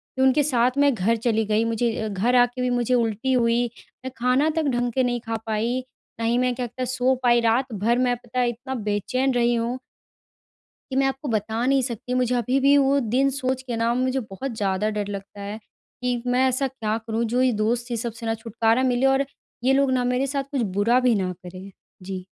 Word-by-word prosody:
फिर 260 - +1
उनके 275 +3 +4
साथ 250 -3 +2
मैं 285 -1 +4
घर 220 +2 +1
चली 225 -1 0
गई। 215 +1 +1
मुझे 230 0 0
अ, 220 - -2
घर 215 +5 0
आके 245 +1 +3
भी 250 - +1
मुझे 245 0 0
उल्टी 230 +2 +1
हुई। 235 -1 +2 0.4
मैं 260 - -4
खाना 255 +6 +2
तक 320 - +1
ढंग 245 0 0
के 260 - +2
नहीं 245 -1 0
खा 225 0 -2
पाई, 225 +3 -1 0.4
ना 230 - -1
ही 235 +2 +2
मैं 250 0 +1
क्या 250 - -3
कहते 255 +2 -5
सो 255 +1 +1
पाई। 240 -1 +5
रात 235 +2 +1
भर 220 +4 +1
मैं 250 -1 +2
पता 245 +1 -5
है 245 -1 +2
इतना 255 +3 -5
बेचैन 235 +5 -1
रही 240 0 +2
हूँ। 235 +2 -1 1.1
कि - - -3
मैं 270 - +3
आपको 270 +2 -4
बता 220 +3 -1
नहीं 270 0 +3
सकती 245 0 -4
मुझे 250 -1 +1
अभी 250 +3 +1
भी 280 +1 +5
वो 280 0 +3 0.2
दिन 275 +1 +4
सोच 260 -1 -2
के 245 -3 -4
ना 230 +1 +1
मुझे 255 +1 0
बहुत 230 +3 -6
ज़्यादा 200 +1 0
डर 205 -1 -2
लगता 200 0 -7
है। 205 +2 -6 0.4
कि 250 -1 -1
मैं 250 +1 +3
ऐसा 260 +1 +1
क्या 225 -4 -3
करूँ 225 0 -3
जो 250 - +3
ये 255 -1 +3
दोस्त 240 +2 -1
ये 235 - -1
सबसे 230 0 -5
ना 225 - 0
छुटकारा 225 +2 0
मिले 255 0 +2
और 270 +1 +3 0.4
ये 265 +2 +4
लोग 275 0 +3
ना 255 -1 +1
मेरे 260 +2 0
साथ 275 0 -2
कुछ 275 -4 0 0.2
बुरा 235 +5 +4
भी 250 -2 +3
ना 185 -2 -1
करें? 185 +2 -10 0.3
जी। 185 -1 -6
245 Hz, 225 wpm, -24 LUFS, 225-260 Hz, 1.1 s, पाई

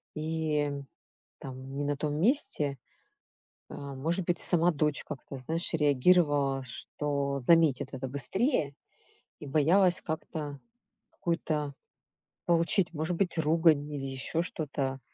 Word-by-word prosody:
и, 155 -2 0 0.7
там, 130 0 -8
не 145 - -2
на 145 0 0
том 145 +1 -2
месте. 160 - +1 0.9
Э, - - -9
может 145 +6 -3
быть, 175 - +1
сама 175 0 +3
дочь 150 -2 0
как-то, 140 -1 -7
знаешь, 160 +7 -3
реагировала, 145 -2 +3
что 140 +2 -3
заметит 160 0 +4
это 130 0 -4
быстрее, 145 - 0 0.7
и - - -8
боялась 175 +6 +4
как-то 155 -3 -5 0.5
какую-то 155 -4 -2 0.7
получить, 170 +1 +2
может 160 +3 -1
быть, 180 -4 0
ругань, 155 -2 +3
или 140 -2 -4
еще 135 +4 -2
что-то. 140 -5 -3
150 Hz, 115 wpm, -30 LUFS, 140-165 Hz, 0.9 s, заметит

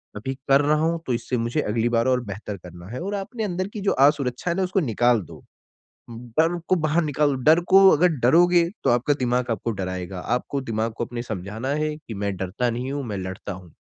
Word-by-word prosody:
अभी 120 +6 -4 0.2
कर 135 +1 +6
रहा 150 +1 +2
हूँ 165 +1 +1
तो 125 - +1
इससे 120 +1 -2
मुझे 120 +6 -1
अगली 115 +1 0
बार 115 -1 +1
और 130 -1 +2
बेहतर 100 0 -6
करना 90 -1 -12
है 125 - -5
और 200 +3 -3
आपने 220 +4 -4
अंदर 185 -2 -2
की 215 - -5
जो 195 - +1
असुरक्षा 140 +1 +2
है - - -1
ना 190 - +1
उसको 185 +1 0
निकाल 120 - +2
दो। - - -13 0.7
बन 125 +9 -1
को - - +4
बाहर 155 +1 +1
निकाल 145 -1 +1
डर 160 +2 +6
को 195 +1 +8
अगर 180 +3 +4
डरोगे 175 +8 +5 0.2
तो - - +4
आपका 125 +5 +2
दिमाग 125 -1 0
आपको 115 +1 -2
डराएगा। 95 -2 -4 0.2
आपको 140 +2 -3
दिमाग 115 -3 -2
को 120 - -1
अपने 120 0 -6
समझाना 110 +2 -5
है 150 +1 -1
कि 135 -7 -10
मैं 100 0 -2
डरता 95 +7 -1
नहीं 125 +3 -4
हूँ, 145 0 -3
मैं 105 -3 -4
लड़ता 95 +2 -6
हूँ। 90 -2 -11
125 Hz, 220 wpm, -23 LUFS, 110-155 Hz, 0.7 s, को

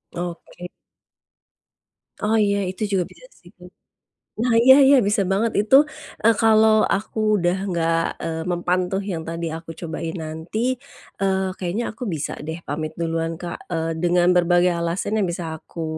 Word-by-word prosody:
Oke. 175 0 -7 1.5
Oh 220 +1 +2
iya, 200 -1 +2
itu 190 +3 -5
juga 190 -2 +2
bisa - - -17 0.2
sih. - - -17 0.8
Nah 230 +1 +1
iya 265 +2 +8
iya 275 0 +7
bisa 205 0 +2
banget 205 +4 +1
itu, 215 +6 +5 0.5
eee, 230 - +7
kalau 220 -1 +5
aku 215 +1 0
udah 175 0 +1
nggak, 165 -2 +1 0.2
eee, 160 0 -3
mempan 180 +1 0
tuh 195 +1 -1
yang 175 -5 -4
tadi 165 0 -4
aku 165 0 -8
cobain 165 0 -5
nanti, 175 +11 -3 0.4
eee, 190 -1 0
kayaknya 185 +6 -2
aku 225 - -14
bisa 155 -4 -3
deh 160 +2 -5
pamit 155 +2 -4
duluan 165 -1 -2
Kak, 175 0 -8
eee, 165 -1 -2
dengan 175 +1 +3
berbagai 175 0 +3
alasan 170 +6 -1
yang 190 - 0
bisa 170 -1 -4
aku, 165 -1 -7
180 Hz, 155 wpm, -22 LUFS, 165-210 Hz, 1.5 s, iya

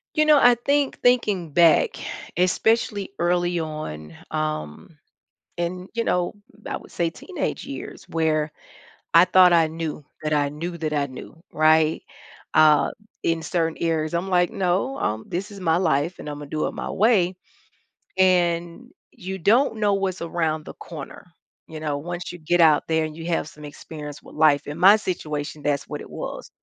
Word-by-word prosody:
You 305 - +4
know, 305 -1 +6
I 245 -2 +6
think 280 +3 0
thinking 210 -9 +2
back, 170 +1 +4 0.4
especially 200 +2 +1
early 175 0 +1
on, 80 - -6 0.2
um, 155 - -4 0.6
in 180 +2 -3
you 230 0 -1
know, 180 -1 0 0.3
I - - -3
would - - -15
say 170 -1 -1
teenage 370 - -5
years - - -8
where 155 -2 0 0.6
I 170 +2 +8
thought 185 0 +6
I 165 -2 +5
knew, 160 -2 -5 0.2
that 155 - -2
I 145 -1 +2
knew, 165 +4 -5
that 155 -2 -3
I 145 -1 0
knew, 130 +4 -10 0.2
right, 155 0 +3 0.5
uh, 155 -1 +5 0.3
in 165 0 0
certain 165 -2 -1
areas, 160 -1 0
I'm 175 +3 -1
like, 180 -1 +3
"No, 190 +9 -1
um, 110 +1 -2
this 195 +5 -4
is 200 - -10
my 165 -3 +2
life, 165 -1 0
and - - -7
Imma 145 0 -6
do 155 +2 -2
it - - -5
my - - -5
way," 190 -4 +2 0.8
and 175 +3 +1 0.2
you 190 -3 -6
don't 225 - +3
know 205 -1 +2
what's 195 -1 -2
around 160 -2 -1
the - - -10
corner, 155 -5 -9 0.4
you 155 -1 -8
know, 150 -2 -2
once 175 +5 -5
you 175 - -9
get 170 +2 +2
out 155 -2 +5
there 160 -1 +1
and 155 0 -5
you 165 - -7
have 165 -2 -1
some 150 -1 -12
experience 150 0 -9
with - - -14
life. 150 -2 +4
In 145 +2 -6
my 195 +4 +8
situation, 150 -7 -4
that's 145 -1 -1
what - - -5
it - - -10
was. - - -7
165 Hz, 175 wpm, -23 LUFS, 155-185 Hz, 0.8 s, I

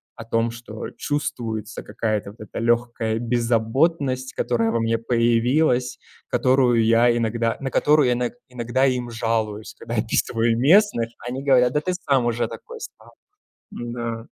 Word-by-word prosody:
о 115 - -9
том, 115 0 0
что 115 -2 -8
чувствуется 115 -7 -4
какая-то 105 -3 -3
вот 105 - -20
эта 105 - -7
лёгкая 115 -1 0
беззаботность, 125 +4 0
которая 115 -2 0
во 115 - 0
мне 115 0 0
появилась, 120 +3 +1 0.3
которую 125 -3 +3
я 120 +1 +4
иногда 115 0 0
на 135 -1 -4
которую 150 -2 +4
я - - +3
ино 120 0 -1 0.2
иногда 125 +1 0
им 125 -2 0
жалуюсь, 110 -2 -2
когда 115 +1 -6
я 110 - +2
описываю 115 0 0
местных. 145 - +4 0.2
Они 130 +2 -4
говорят: 125 -3 +4
"Да 150 - +1
ты 185 +2 -2
сам 135 -8 +1
уже 120 0 0
такой 470 -2 -10
стал". - - -11 0.6
Да. 120 -1 -5
120 Hz, 150 wpm, -23 LUFS, 115-130 Hz, 0.6 s, я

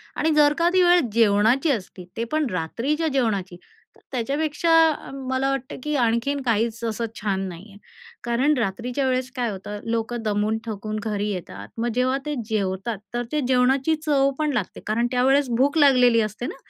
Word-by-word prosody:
आणि 320 - +1
जर 295 -1 +5
का 335 +1 +3
ती 370 - +4
वेळ 355 0 +6
जेवणाची 225 +6 +3
असती, 185 -6 -5
ते 230 - -1
पण 310 -1 +1
रात्रीच्या 235 - -1
जेवणाची, 215 - -1 0.4
तर - - -23
त्याच्यापेक्षा 290 +6 -1 0.6
मला 260 +1 0
वाटतं, 270 -1 -3
की 300 0 -2
आणखीन 240 +4 +1
काहीच 230 -1 -1
असं 230 0 -2
छान 200 -2 -2
नाही 180 +3 -10
आहे. 200 - -15 0.5
कारण 240 +5 +2
रात्रीच्या 240 +5 -2
वेळेस 255 0 0
काय 245 -3 -1
होतं, 205 +1 -7
लोकं 230 +1 -2
दमून 210 +1 0
थकून 215 -1 -4
घरी 210 -2 -2
येतात, 110 - -7
मग 235 +1 -1
जेव्हा 255 +1 +1
ते 300 0 -2
जेवतात 200 +1 -2 0.2
तर 240 0 -1
ते 300 - 0
जेवणाची 265 +4 +2
चवपण 280 +1 +1
लागते. 215 -7 -3
कारण 235 +3 +1
त्यावेळेस 265 +2 +3
भूक 285 +5 +2
लागलेली 250 -5 +5
असते 215 +2 -4
ना, 350 - -6
240 Hz, 170 wpm, -23 LUFS, 215-275 Hz, 0.6 s, वेळ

